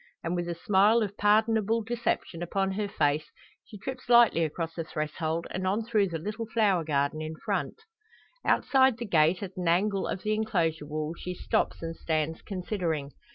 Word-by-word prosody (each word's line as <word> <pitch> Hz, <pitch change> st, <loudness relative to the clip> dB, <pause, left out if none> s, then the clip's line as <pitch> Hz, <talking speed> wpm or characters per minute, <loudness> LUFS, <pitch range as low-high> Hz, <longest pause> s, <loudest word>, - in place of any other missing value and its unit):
And 165 Hz, +2 st, -1 dB
with 175 Hz, 0 st, -2 dB
a 170 Hz, -, -2 dB
smile 205 Hz, +6 st, +4 dB
of 205 Hz, -1 st, -4 dB
pardonable 220 Hz, +1 st, +2 dB
deception 230 Hz, -6 st, -2 dB
upon 195 Hz, +2 st, -1 dB
her 205 Hz, +2 st, -2 dB
face, 150 Hz, -5 st, 0 dB, 0.3 s
she 220 Hz, -, -12 dB
trips 255 Hz, +4 st, -7 dB
lightly 235 Hz, -8 st, +6 dB
across 165 Hz, +1 st, -3 dB
the 165 Hz, -, -4 dB
threshold, 160 Hz, +1 st, -3 dB
and 185 Hz, 0 st, -2 dB
on 205 Hz, +4 st, +1 dB
through 215 Hz, -3 st, +2 dB
the 165 Hz, -, -3 dB
little 210 Hz, +7 st, -5 dB
flower 205 Hz, -6 st, +2 dB
garden 145 Hz, 0 st, 0 dB
in 155 Hz, +1 st, -5 dB
front. 450 Hz, -, -3 dB, 0.6 s
Outside 265 Hz, -3 st, +3 dB
the 240 Hz, -, -4 dB
gate, 170 Hz, -1 st, +3 dB
at 190 Hz, -1 st, -7 dB
an 180 Hz, -2 st, -2 dB
angle 195 Hz, +3 st, +2 dB
of 185 Hz, -, -4 dB
the 215 Hz, -, +1 dB
enclosure 170 Hz, -9 st, 0 dB
wall, 155 Hz, +1 st, -3 dB
she 180 Hz, +1 st, -6 dB
stops, -, -, -1 dB
and 165 Hz, 0 st, -4 dB
stands 160 Hz, 0 st, -2 dB
considering. 175 Hz, -7 st, -3 dB
185 Hz, 180 wpm, -28 LUFS, 160-215 Hz, 0.6 s, lightly